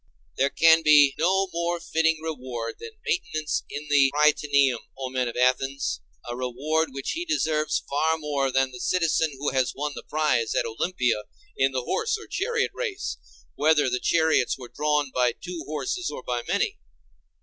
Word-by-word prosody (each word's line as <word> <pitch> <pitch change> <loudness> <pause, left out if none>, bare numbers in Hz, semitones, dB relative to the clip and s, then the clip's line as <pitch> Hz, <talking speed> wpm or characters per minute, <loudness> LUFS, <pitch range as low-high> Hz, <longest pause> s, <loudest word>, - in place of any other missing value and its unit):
There 140 - +2
can 165 +1 +5
be 150 -3 +6
no 190 +4 +2
more 170 +1 -1
fitting 160 -1 +1
reward 125 -7 -5
than 455 -1 -9
maintenance 155 - -1
in 150 +1 -6
the 140 -2 +4
Prytaneum, 145 -4 +3 0.2
O 130 -1 -4
men 130 -1 0
of 120 - -5
Athens, 130 - +1 0.3
a 120 - -4
reward 140 +6 -1
which 135 0 -4
he 340 - -3
deserves 160 - 0
far 160 +3 +1
more 145 -3 -1
than 135 0 +1
the 125 - -9
citizen 165 0 +1
who 145 +2 -1
has 130 -1 0
won 150 +2 -2
the - - -7
prize 140 -7 0
at - - +1
Olympia 120 -2 -1 0.3
in 135 0 +2
the 130 -1 -2
horse 440 - 0
or 430 - -11
chariot 470 +3 -1
race, 415 -5 -4 0.4
whether 150 -3 +3
the 125 - 0
chariots 160 -5 +2
were 125 -2 -10
drawn 150 -2 0
by 125 -2 +2
two 175 +3 -7
horses 250 - -2
or - - -7
by 120 -1 -2
many. - - 0
150 Hz, 170 wpm, -25 LUFS, 130-160 Hz, 0.4 s, be